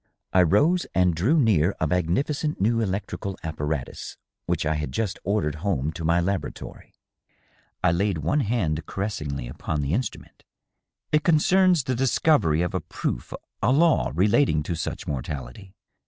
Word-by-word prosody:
I 95 - +6
rose 145 - +3
and 90 -1 +3
drew 115 - +2
near 100 - +3
a - - +1
magnificent 95 - 0
new 115 +4 +2
electrical 100 -1 -3
appa 80 -2 -5
ratus 75 -4 -4 0.3
which - - 0
I 75 - +1
had 75 -3 -3
just 100 - -2
ordered 100 -6 0
home 80 -7 0
to 80 +1 -7
my 85 +2 +3
laboratory. 90 -3 -4 0.9
I - - +4
laid 95 +1 0
one 80 - 0
hand 100 - -1
caressingly 75 - -4
upon 75 +5 -3
the 70 +3 -1
instrument. 120 +2 -4 0.3
" - - -57
It 150 - +3
concerns 175 0 +4
the 130 - -1
discovery 125 - +2
of 90 - -3
a - - -1
proof - - -4 0.2
— - - -57
^a 125 +7 +3
law 165 -3 +3
— - - -9
relating 100 - +3
to 85 - -3
such 80 - -4
mortality." 70 +7 -6
95 Hz, 165 wpm, -25 LUFS, 80-120 Hz, 0.9 s, I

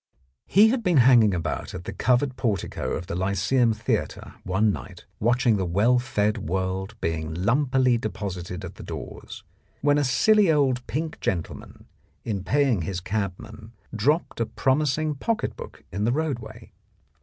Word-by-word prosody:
He 210 +3 +6
had 250 +1 0
been 180 -7 +2
hanging 120 -5 +6
about 85 +1 -4
at 90 - -6
the - - -6
covered 130 +1 +1
portico 100 - -2
of 90 - -4
the 90 - -6
Lyceum 100 +7 +1
Theatre 110 - -3
one 105 +3 +2
night 90 -4 -9
watching 120 0 +2
the 95 - -1
well 105 +8 +3
fed 110 -4 0
world 95 +3 -3
being 80 -1 -2
lumpily 130 - +2
deposited 95 -4 -5
at 85 - -10
the - - -9
doors, - - -8 0.4
when 145 +1 +3
a - - +2
silly 195 +9 +4
old 130 -5 +1
pink 155 +1 -3
gentleman, 85 -4 -4 0.4
in 100 -5 -3
paying 135 -5 +2
his 90 +2 -3
cabman, 105 +3 -5 0.2
dropped 145 +9 0
a 115 - 0
promis 135 +1 +1
ing 155 -1 -1
pocket 220 - -2
book - - -10
in 100 +3 -2
the 120 - +2
roadway. 120 -7 -4
115 Hz, 155 wpm, -25 LUFS, 95-135 Hz, 0.4 s, He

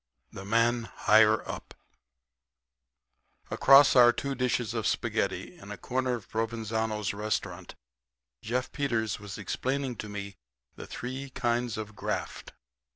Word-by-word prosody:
'" 65 -2 -48
THE 95 - -9
MAN 115 +2 +2
HIGHER 110 0 +4
UP - - -7 1.8
Across 135 0 +7
our 120 -1 +8
two 140 +3 -3
dishes 125 -3 -1
of 115 -2 -1
spaghetti, - - -1
in - - -12
a - - -6
corner 130 0 -1
of 115 - -9
Provenzano's 110 -2 -2
restaurant, 100 -4 -3 0.7
Jeff 125 +3 -2
Peters 115 -7 -1
was 105 -1 -8
explaining 135 -1 -2
to 105 - -6
me 100 -1 -6 0.4
the - - -9
three 130 +3 -6
kinds 120 -2 -1
of 110 -1 -6
graft. - - -4
115 Hz, 130 wpm, -29 LUFS, 105-125 Hz, 1.8 s, our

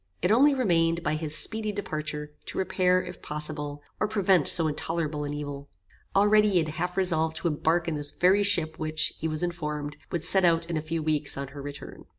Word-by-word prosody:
It 180 - +2
only 275 +5 +5
remained, 170 -8 +1
by - - 0
his 155 -1 0
speedy 220 +2 +2
departure, 155 -6 -5
to - - -7
repair, 185 -1 +1
if - - -10
possible, 150 -1 -6 0.2
or 215 - +1
prevent 195 -7 +2
so 165 -3 +5
intolerable 155 -1 -3
an 145 - -4
evil. 145 -1 -7 0.5
Already 210 +1 +4
he - - +3
had 160 -2 +1
half 180 +4 -4
resolved 160 -4 +3
to 175 - -2
embark 165 +2 0
in 165 - -1
this 145 -1 -3
very 185 +6 +2
ship 170 -6 +2
which, 155 0 0
he 160 - -3
was 155 +1 -2
informed, 150 -4 -4
would 170 -3 -2
set 190 +2 +6
out 165 -1 +3
in 170 0 -4
a 155 - -1
few 160 +1 -4
weeks 150 -2 0
on 140 -1 -5
her 140 0 -9
return. 145 0 -9
160 Hz, 205 wpm, -26 LUFS, 150-180 Hz, 0.5 s, set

